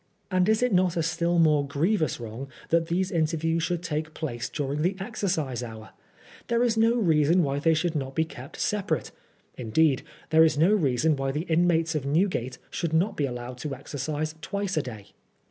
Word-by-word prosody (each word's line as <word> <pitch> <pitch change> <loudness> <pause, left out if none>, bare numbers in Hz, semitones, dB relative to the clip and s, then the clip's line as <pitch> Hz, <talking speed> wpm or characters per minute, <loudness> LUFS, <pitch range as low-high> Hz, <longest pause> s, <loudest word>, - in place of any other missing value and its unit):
And 185 +2 +3
is 220 +2 +3
it 250 -4 +2
not 180 -1 +2
a 165 - +1
still 170 +1 0
more 155 -3 +4
grievous 155 +5 0
wrong 120 +4 -6 0.2
that 165 0 +2
these 185 +2 0
interviews 165 0 0
should 175 +1 -1
take 155 -2 -3
place 120 -7 -4
during 145 0 -2
the 180 +4 +1
exercise 160 - -2
hour? 110 -2 -8 0.6
There 235 0 +2
is 235 -2 +2
no 225 +1 +3
reason 170 -4 +3
why 140 -1 -1
they 160 +2 +3
should 160 +1 0
not 135 -2 -3
be 160 - +2
kept 130 -3 -10
sepa 205 -2 -1
rate; 160 - -1 0.5
indeed 130 +4 +2 0.3
there 160 0 +7
is 160 -2 +3
no 170 +7 +4
reason 150 - +2
why 135 -1 -2
the 150 +3 -2
inmates 165 0 +2
of 145 -3 -2
Newgate 150 -5 0
should 165 -2 -2
not 190 +6 +2
be 145 - 0
allowed 125 0 -6
to 140 0 -4
exercise 145 +3 -4
twice 200 +3 -3
a 155 - +2
day. 110 -6 -9
160 Hz, 195 wpm, -26 LUFS, 140-175 Hz, 0.6 s, there